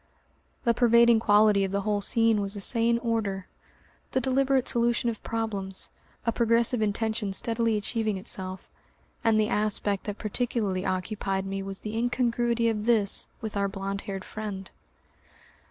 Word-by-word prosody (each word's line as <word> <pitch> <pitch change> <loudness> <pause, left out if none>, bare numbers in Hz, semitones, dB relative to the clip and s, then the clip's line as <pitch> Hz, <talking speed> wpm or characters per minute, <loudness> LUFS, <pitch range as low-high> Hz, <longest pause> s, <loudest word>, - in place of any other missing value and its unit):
The 235 -2 +3
pervading 235 -1 +5
quality 210 -2 +4
of 190 - -2
the 200 0 0
whole 205 0 0
scene 225 +1 +2
was 200 +1 -3
a - - -5
sane 230 +3 +3
order, 210 -5 -1 0.7
the 260 - +3
deliberate 265 0 +1
solution 235 0 +2
of 220 - -10
problems, 205 -4 -3 0.4
a 230 - +2
progressive 230 0 +2
intention 215 -1 -1
steadily 230 +1 +1
achieving 215 -1 -1
itself, 190 -1 -2 0.6
and 225 -1 +3
the 215 - +2
aspect 210 -2 0
that 205 -1 -4
particularly 215 -4 -2
occupied 195 +1 -2
me 195 0 -3
was 195 0 -6
the 215 +1 -5
incongruity 235 0 +1
of 215 -1 -1
this 215 -4 +1
with 220 -2 -5
our 200 0 +1
blond 195 0 -4
haired 195 -1 -5
friend. 205 -3 -6
215 Hz, 150 wpm, -27 LUFS, 200-235 Hz, 0.7 s, pervading